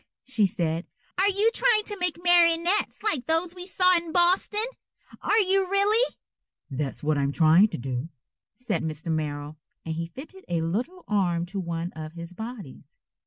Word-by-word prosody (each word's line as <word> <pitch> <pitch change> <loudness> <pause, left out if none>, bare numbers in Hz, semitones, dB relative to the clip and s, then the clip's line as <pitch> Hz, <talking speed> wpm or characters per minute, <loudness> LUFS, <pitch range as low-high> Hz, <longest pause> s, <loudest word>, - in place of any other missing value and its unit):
_" - - -37 0.2
she 230 -6 +2
said. 165 -1 -2 0.3
"Are 395 +2 +5
you 410 +3 +3
trying 455 -4 +3
to 415 -1 -6
make 355 -2 -1
marionettes 345 +3 +3
like 325 - +1
those 325 +2 0
we 360 0 -8
saw 365 -1 +4
in 335 -1 -4
Boston? 370 +5 +2 0.6
Are 430 - +2
you 385 -1 +2
really?" 415 +5 +3 0.6
"That's 135 +1 -4
what 150 -1 +1
I'm 140 0 +1
trying 165 +6 +5
to - - -6
do," 130 +4 -4 0.5
said 225 -1 -2
Mr. 160 +1 -3
Merrill, 150 -1 -3 0.3
and 160 - -3
he 165 +1 -3
fitted 315 - -11
a 170 -1 0
little 245 - -3
arm 175 -5 +1
to 195 +3 -5
one 170 -1 -3
of 155 0 -8
his 170 +1 -8
bodies. 220 - -9
220 Hz, 170 wpm, -26 LUFS, -, 0.6 s, Are